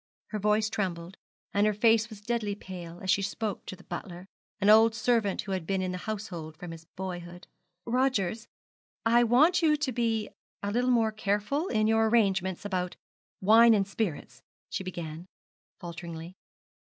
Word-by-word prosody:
Her 215 - -3
voice 210 +1 +2
trembled, 185 -4 -3 0.4
and 205 +1 +3
her 210 - +1
face 225 +1 +4
was 215 -2 -11
deadly 210 -2 -1
pale 175 -4 -9
as 190 -1 +1
she 200 - +3
spoke 205 +1 -3
to - - -5
the 180 - -17
butler, 175 +1 -7 0.3
an 200 - +1
old 220 +1 +7
servant 225 -3 +1
who 200 - -6
had 185 -4 -3
been 190 -1 0
in 185 - -2
the 180 - -4
household 175 -8 -5
from 175 +1 -8
his 165 0 -10
boyhood. 175 -1 -6 0.4
'Rogers, 235 -4 0 0.6
I 235 +1 +5
want 305 +10 +4
you 305 -2 +4
to 290 -3 -1
be 225 -3 0 0.3
a 200 - -1
little 245 +3 +1
more 230 -3 +3
careful 215 - -1
in 215 - +1
your 225 0 +3
arrangements 195 -5 +1
about 180 -3 -2 0.5
wine 225 +3 +7
and 195 -2 +1
spirits,' 165 - -4 0.3
she - - -3
began, 170 -2 -6 0.5
falteringly. 170 0 -7
205 Hz, 170 wpm, -29 LUFS, 180-225 Hz, 0.6 s, old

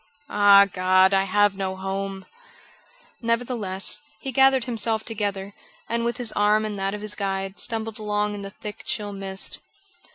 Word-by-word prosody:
Ah, 200 -1 +7
God, 185 0 +3
I 195 0 +3
have 205 +1 +3
no 190 -1 -3
home!" 195 0 -4 1.0
Nevertheless, 230 -4 -1 0.2
he 270 - -5
gathered 265 0 +4
himself 225 -2 -1
together, 200 -3 -3 0.3
and 235 0 -1
with 235 +1 -1
his 245 -3 +1
arm 210 +1 +2
in 210 -1 -3
that 195 +1 -2
of 210 - -8
his 210 0 -2
guide, 195 -1 -3
stumbled 225 -1 -2
along 210 0 -1
in 205 - -6
the 195 - -6
thick, 205 +1 -8
chill 205 -1 -2
mist. 195 -1 -2
205 Hz, 160 wpm, -24 LUFS, 195-220 Hz, 1.0 s, Ah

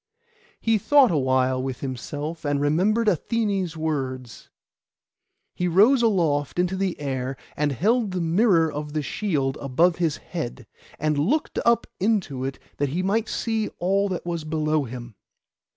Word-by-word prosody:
He 225 -1 +2
thought 275 +1 +5
awhile 130 -3 +2
with 130 -1 -4
himself, 145 +5 -5
and 145 -1 0
remembered 185 +11 +2
Athené's 200 -3 0
words. 130 -6 -4 1.0
He 180 - -1
rose 215 +10 +5
aloft 165 -11 +1
into 180 +1 +1
the 190 -1 -2
air, 130 -2 -3 0.2
and 150 0 0
held 215 - +1
the 185 -1 -3
mirror 170 -1 +3
of 150 0 -5
the 155 -1 -1
shield 140 -6 -1
above 160 +6 +2
his 165 -4 0
head, 135 -8 -6 0.3
and 150 -1 0
looked 270 - 0
up 235 0 +4
into 185 - 0
it 135 0 -4 0.2
that 145 -1 0
he 175 +7 -2
might 215 +4 0
see 225 -2 -1
all 195 +3 +1
that 180 -2 -4
was 170 -2 -3
below 155 -1 0
him. 120 -1 -8
160 Hz, 150 wpm, -24 LUFS, 140-195 Hz, 1.0 s, thought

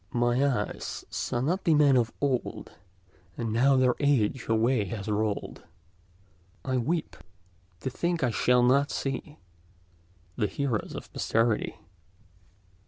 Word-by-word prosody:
"My 120 +2 +2
eyes 125 -7 -2
saw 120 - -2
not 175 +9 0
the 160 - +4
men 145 -2 +5
of 120 -2 +2
old; 135 -4 -2 0.7
And 115 -2 -2
now 135 +4 +4
their 130 -1 +4
age 130 -4 +1
away 115 0 +2
has 100 +1 -6
rolled. 105 -1 -2 1.0
I 130 -1 0
weep—to 90 - -5
think 170 +3 -1
I 125 - +2
shall 125 +2 +3
not 140 +3 +4
see 140 +2 -4 1.0
The 105 - +1
heroes 130 -5 -2
of - - -9
posterity." 115 -1 0
125 Hz, 120 wpm, -28 LUFS, 110-140 Hz, 1.0 s, men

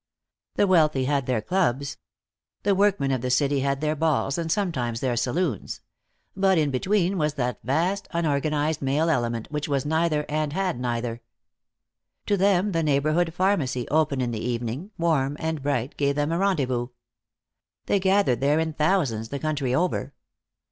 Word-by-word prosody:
The - - +3
wealthy 155 -8 +3
had 140 -2 0
their 120 -4 0
clubs. 140 - 0 0.7
The 200 - +3
workmen 195 -8 +2
of 130 -3 0
the 125 - -2
city 140 +2 +2
had 140 +1 -1
their 155 0 0
balls 155 -1 0
and 165 -1 -2
sometimes 130 - -1
their 125 -1 0
saloons. 130 - -2 0.5
But 190 -1 +3
in 150 -3 +2
between 185 +6 +1
was 150 -1 0
that 125 -3 -2
vast, 175 +9 0
unorganized 155 -1 0
male 145 +5 +1
element 120 -4 -1
which 150 -1 -2
was 140 -2 -1
neither, 160 -1 +1
and 150 -1 -1
had 185 -7 -1
neither. 120 -1 -3 1.0
To 205 - +2
them 195 0 +2
the 165 -2 0
neighborhood 155 +3 +1
pharmacy, 160 -9 0
open 150 -3 +1
in 120 -1 -1
the 110 -2 -4
evening, 120 - -3
warm 145 -4 +1
and 160 -2 -2
bright, 140 -1 -1
gave 140 -1 +1
them 145 +2 0
a 165 - 0
rendezvous. 135 -11 0 1.0
They 200 - +2
gathered 190 -9 +2
there 145 +2 +3
in 160 0 -1
thousands, 150 - 0
the 140 - -3
country 140 -4 -1
over. 180 +4 -1
150 Hz, 160 wpm, -25 LUFS, 130-170 Hz, 1.0 s, The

